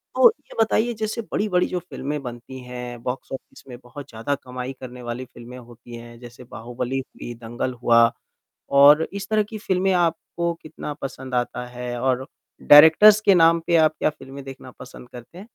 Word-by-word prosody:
तो 485 Hz, -, +7 dB
ये -, -, -17 dB
बताइए 225 Hz, +2 st, +1 dB
जैसे 220 Hz, +1 st, -4 dB
बड़ी-बड़ी 185 Hz, -4 st, +1 dB
जो 180 Hz, -, -3 dB
फ़िल्में 145 Hz, -2 st, -6 dB
बनती 120 Hz, +2 st, -9 dB
हैं 125 Hz, -1 st, -8 dB
बॉक्स 125 Hz, +2 st, -5 dB
ऑफ़िस 135 Hz, -, -10 dB
में 125 Hz, -2 st, -9 dB
बहुत 135 Hz, +3 st, -11 dB
ज़्यादा 115 Hz, +5 st, -3 dB
कमाई 125 Hz, +1 st, -6 dB
करने 125 Hz, -1 st, -10 dB
वाली 120 Hz, +1 st, -6 dB
फ़िल्में 120 Hz, 0 st, -12 dB
होती 120 Hz, -1 st, -13 dB
हैं। 120 Hz, 0 st, -12 dB
जैसे 120 Hz, +1 st, -13 dB
बाहुबली 120 Hz, +2 st, -5 dB
हुई, 125 Hz, -2 st, -9 dB
दंगल 120 Hz, +2 st, -5 dB
हुआ 115 Hz, 0 st, +5 dB, 0.7 s
और 145 Hz, +3 st, +7 dB
इस 200 Hz, 0 st, -6 dB
तरह 215 Hz, -1 st, +2 dB
की 220 Hz, -, -7 dB
फ़िल्में 190 Hz, -2 st, 0 dB
आपको 170 Hz, 0 st, -1 dB
कितना 155 Hz, -1 st, -7 dB
पसंद 130 Hz, -1 st, -6 dB
आता 125 Hz, 0 st, -2 dB
है 125 Hz, 0 st, -6 dB
और 130 Hz, 0 st, 0 dB, 0.4 s
डायरेक्टर्स 160 Hz, +8 st, +8 dB
के 200 Hz, -2 st, +4 dB
नाम 165 Hz, -1 st, +5 dB
पे 170 Hz, -, +2 dB
आप 155 Hz, -1 st, +4 dB
क्या -, -, +2 dB
फ़िल्में 135 Hz, -2 st, -11 dB
देखना 130 Hz, -1 st, -11 dB
पसंद 125 Hz, -1 st, -12 dB
करते 125 Hz, +8 st, -13 dB
हैं? 190 Hz, -, -10 dB
130 Hz, 180 wpm, -22 LUFS, 120-165 Hz, 0.7 s, डायरेक्टर्स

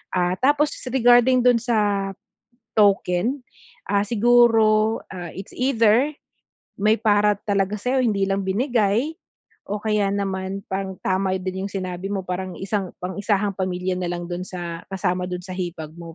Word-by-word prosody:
ah, 180 Hz, -1 st, +2 dB
tapos 290 Hz, +3 st, +3 dB, 0.2 s
regarding 245 Hz, 0 st, +4 dB
dun 245 Hz, -1 st, +5 dB
sa 205 Hz, -4 st, 0 dB, 0.7 s
token, 205 Hz, +5 st, +2 dB, 0.5 s
ah, 200 Hz, 0 st, +2 dB
siguro, 225 Hz, -1 st, +4 dB
ah, 175 Hz, -3 st, -7 dB
it's 195 Hz, +1 st, -8 dB
either 250 Hz, +2 st, +3 dB, 0.6 s
may 215 Hz, +3 st, +2 dB
para 210 Hz, -1 st, +3 dB
talaga 200 Hz, 0 st, 0 dB
sa'yo 255 Hz, +5 st, 0 dB
hindi 205 Hz, -5 st, +1 dB
lang 195 Hz, 0 st, 0 dB
binigay 230 Hz, +6 st, +1 dB, 0.5 s
o 205 Hz, -, -3 dB
kaya 210 Hz, -2 st, +1 dB
naman 195 Hz, -1 st, -3 dB
pang 190 Hz, 0 st, -3 dB
tama 190 Hz, 0 st, 0 dB
din 190 Hz, +1 st, -4 dB
yung 200 Hz, -, -9 dB
sinabi 185 Hz, -1 st, -4 dB
mo 200 Hz, -1 st, -2 dB
parang 185 Hz, 0 st, -4 dB
isang 195 Hz, -1 st, -3 dB
pang-isahang 200 Hz, +2 st, 0 dB
pamilya 185 Hz, 0 st, -2 dB
na 180 Hz, -, -2 dB
lang 175 Hz, 0 st, -4 dB
dun 175 Hz, +1 st, -3 dB
sa 170 Hz, -2 st, -6 dB
kasama 180 Hz, -2 st, -1 dB
dun 180 Hz, 0 st, -4 dB
sa 185 Hz, -, -11 dB
hipag 170 Hz, -4 st, -5 dB
mo. 165 Hz, -1 st, -9 dB
200 Hz, 150 wpm, -23 LUFS, 185-225 Hz, 0.7 s, dun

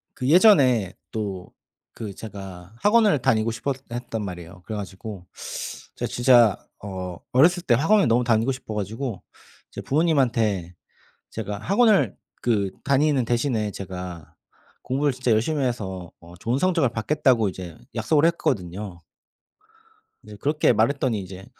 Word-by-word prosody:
그 130 Hz, -, -3 dB
예전에 135 Hz, -, +5 dB, 0.2 s
또 100 Hz, -4 st, -5 dB, 0.4 s
그 105 Hz, -4 st, -7 dB
제가 95 Hz, -3 st, -9 dB
학원을 210 Hz, -, +4 dB
다니고 115 Hz, -1 st, +2 dB
싶어했단 120 Hz, -2 st, -4 dB
말이에요. 90 Hz, -1 st, -8 dB
그래 110 Hz, -, -4 dB
가지고 95 Hz, -1 st, -7 dB, 0.7 s
제가 -, -, -3 dB
진짜 120 Hz, -5 st, +5 dB, 0.2 s
어 95 Hz, -3 st, -6 dB, 0.2 s
어렸을 175 Hz, +7 st, +5 dB
때 125 Hz, -, +3 dB
학원에 185 Hz, -, +4 dB
너무 120 Hz, +2 st, +3 dB
다니고 120 Hz, +2 st, +2 dB
싶어 120 Hz, -4 st, -8 dB
가지고 105 Hz, +1 st, -4 dB, 0.5 s
이제 -, -, -7 dB
부모님한테 120 Hz, -, +1 dB, 0.6 s
"제가 105 Hz, 0 st, -4 dB
학원을 205 Hz, -, +3 dB, 0.3 s
그 105 Hz, -5 st, +1 dB
다니는 140 Hz, -2 st, +2 dB
대신에 115 Hz, -3 st, 0 dB
제가 90 Hz, -4 st, -8 dB, 0.5 s
공부를 140 Hz, +3 st, 0 dB
진짜 125 Hz, -1 st, -1 dB
열심히 135 Hz, +7 st, +1 dB
해서 95 Hz, -8 st, -3 dB
어 85 Hz, +1 st, -14 dB
좋은 120 Hz, +8 st, -1 dB
성적을 170 Hz, -8 st, +2 dB
받겠다."고 115 Hz, -2 st, +2 dB
이제 90 Hz, -3 st, -8 dB, 0.2 s
약속을 155 Hz, -1 st, +2 dB
했거든요. 100 Hz, -, -1 dB, 1.3 s
이제 105 Hz, -, -11 dB
그렇게 150 Hz, -2 st, +2 dB
말했더니 120 Hz, 0 st, +1 dB
이제 95 Hz, 0 st, -9 dB
115 Hz, 305 characters per minute, -24 LUFS, 95-140 Hz, 1.3 s, 예전에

